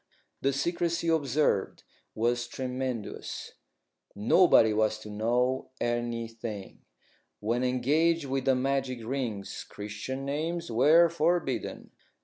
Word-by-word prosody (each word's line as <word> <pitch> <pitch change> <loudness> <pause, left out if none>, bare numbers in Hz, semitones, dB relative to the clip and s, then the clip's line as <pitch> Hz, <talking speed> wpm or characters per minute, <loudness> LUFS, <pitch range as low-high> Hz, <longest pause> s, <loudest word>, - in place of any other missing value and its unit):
The 135 - +2
secrecy 170 +4 -1
observed 145 -8 +1 0.3
was 120 +2 0
tremendous. 130 -3 -4 0.6
Nobody 110 - +5
was 110 0 +1
to 105 - -8
know 120 +5 0
anything. 115 -3 -3 0.6
When 115 +4 0
engaged 145 +6 +2
with 135 -1 -2
the 135 -1 +4
magic 130 -2 -1
rings, 115 -6 -3
Christian 105 +6 -6
names 160 +2 -2
were 155 +9 +6
forbidden. 165 -4 -1
130 Hz, 100 wpm, -29 LUFS, 115-145 Hz, 0.6 s, were